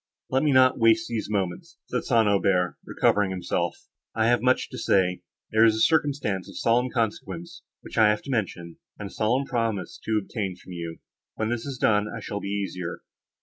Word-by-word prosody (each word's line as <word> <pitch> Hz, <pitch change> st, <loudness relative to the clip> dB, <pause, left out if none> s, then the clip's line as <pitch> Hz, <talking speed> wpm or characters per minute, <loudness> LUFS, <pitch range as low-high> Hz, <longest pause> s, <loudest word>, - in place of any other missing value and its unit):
"Let 130 Hz, +1 st, +3 dB
me 150 Hz, -, +2 dB
not 130 Hz, -1 st, +5 dB
waste 115 Hz, -1 st, +4 dB
these 115 Hz, -3 st, -3 dB
moments," 105 Hz, -, -3 dB
said 125 Hz, -, -3 dB
St. 115 Hz, -3 st, +3 dB
Aubert, 95 Hz, -3 st, +2 dB
recovering 100 Hz, -2 st, +2 dB
himself, 95 Hz, -1 st, -2 dB, 0.3 s
"I 110 Hz, -, +2 dB
have 120 Hz, -, +3 dB
much 130 Hz, +1 st, +2 dB
to -, -, -6 dB
say. 90 Hz, -2 st, +2 dB, 0.3 s
There 110 Hz, +1 st, +5 dB
is 110 Hz, -1 st, +5 dB
a -, -, -2 dB
circumstance 140 Hz, -, +1 dB
of -, -, -10 dB
solemn 120 Hz, +2 st, +2 dB
consequence, 165 Hz, +10 st, -3 dB, 0.2 s
which -, -, -5 dB
I 110 Hz, -1 st, +7 dB
have 105 Hz, 0 st, 0 dB
to 140 Hz, -, -6 dB
mention, 90 Hz, -8 st, -3 dB, 0.2 s
and 100 Hz, -, -6 dB
a -, -, -15 dB
solemn 120 Hz, +5 st, +1 dB
promise 115 Hz, -6 st, -2 dB
to 110 Hz, -1 st, +1 dB
obtain 100 Hz, -2 st, -4 dB
from 95 Hz, -, -14 dB
you; 85 Hz, -2 st, -6 dB, 0.4 s
when 110 Hz, 0 st, -1 dB
this 120 Hz, +2 st, -3 dB
is 135 Hz, -2 st, -5 dB
done 105 Hz, -3 st, +2 dB
I 115 Hz, -, -6 dB
shall 105 Hz, -1 st, -5 dB
be 100 Hz, -, -6 dB
easier. 95 Hz, -4 st, -4 dB
110 Hz, 195 wpm, -26 LUFS, 100-125 Hz, 0.4 s, I